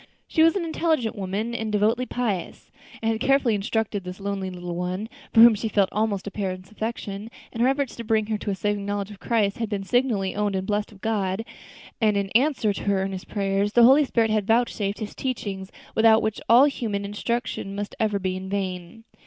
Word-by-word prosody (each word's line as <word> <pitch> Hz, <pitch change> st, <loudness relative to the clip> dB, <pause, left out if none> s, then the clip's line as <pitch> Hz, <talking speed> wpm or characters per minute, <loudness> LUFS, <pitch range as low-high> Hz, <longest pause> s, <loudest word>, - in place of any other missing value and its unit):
She 320 Hz, -, +1 dB
was 330 Hz, +3 st, +5 dB
an 370 Hz, -4 st, -1 dB
intelligent 315 Hz, -8 st, 0 dB
woman 205 Hz, +4 st, -3 dB
and 220 Hz, -2 st, -3 dB
devotedly 220 Hz, +5 st, +1 dB
pious, 220 Hz, -8 st, -3 dB, 0.3 s
and 225 Hz, -, +2 dB
had 220 Hz, -, -2 dB
carefully 270 Hz, -4 st, +3 dB
instructed 205 Hz, -1 st, -1 dB
this 180 Hz, +1 st, -7 dB
lonely 200 Hz, -1 st, -3 dB
little 180 Hz, -1 st, -6 dB
one, 180 Hz, +4 st, -3 dB, 0.2 s
for 225 Hz, -, +6 dB
whom 235 Hz, 0 st, +10 dB
she 220 Hz, +1 st, -3 dB
felt 200 Hz, -3 st, +2 dB
almost 210 Hz, -2 st, -1 dB
a 200 Hz, -, -5 dB
parent's 185 Hz, -2 st, -4 dB
affection, 215 Hz, -1 st, -5 dB, 0.2 s
and 230 Hz, -, -3 dB
her 245 Hz, -, +5 dB
efforts 275 Hz, -2 st, -1 dB
to 235 Hz, -, -5 dB
bring 220 Hz, -1 st, +1 dB
her 215 Hz, 0 st, -1 dB
to -, -, -4 dB
a 195 Hz, -, 0 dB
saving 205 Hz, +1 st, -1 dB
knowledge 205 Hz, 0 st, -3 dB
of 200 Hz, -, -12 dB
Christ 215 Hz, -4 st, 0 dB
had 225 Hz, -2 st, -2 dB
been 200 Hz, -2 st, -2 dB
signally 220 Hz, -3 st, +1 dB
owned 205 Hz, -1 st, 0 dB
and 190 Hz, 0 st, -2 dB
blessed 205 Hz, +1 st, -1 dB
of 195 Hz, -2 st, -17 dB
God; 205 Hz, -1 st, -1 dB, 0.6 s
and 210 Hz, -2 st, +3 dB
in 195 Hz, -1 st, -2 dB
answer 250 Hz, -4 st, +2 dB
to -, -, -6 dB
her 200 Hz, -1 st, +2 dB
earnest 190 Hz, -1 st, -5 dB
prayers, 200 Hz, 0 st, 0 dB
the 240 Hz, -, +6 dB
Holy 270 Hz, +5 st, +7 dB
Spirit 230 Hz, -5 st, +1 dB
had 215 Hz, -2 st, 0 dB
vouchsafed 225 Hz, -3 st, +1 dB
His 215 Hz, -2 st, -6 dB
teachings, 200 Hz, -7 st, -4 dB, 0.2 s
without 225 Hz, 0 st, +5 dB
which 220 Hz, -1 st, -2 dB
all 240 Hz, +4 st, +8 dB
human 220 Hz, -8 st, -2 dB
instruction 210 Hz, -1 st, -3 dB
must 205 Hz, 0 st, -4 dB
ever 215 Hz, -2 st, +1 dB
be 185 Hz, -1 st, -2 dB
in 190 Hz, 0 st, -6 dB
vain. 190 Hz, +1 st, -4 dB
210 Hz, 210 wpm, -24 LUFS, 195-230 Hz, 0.6 s, whom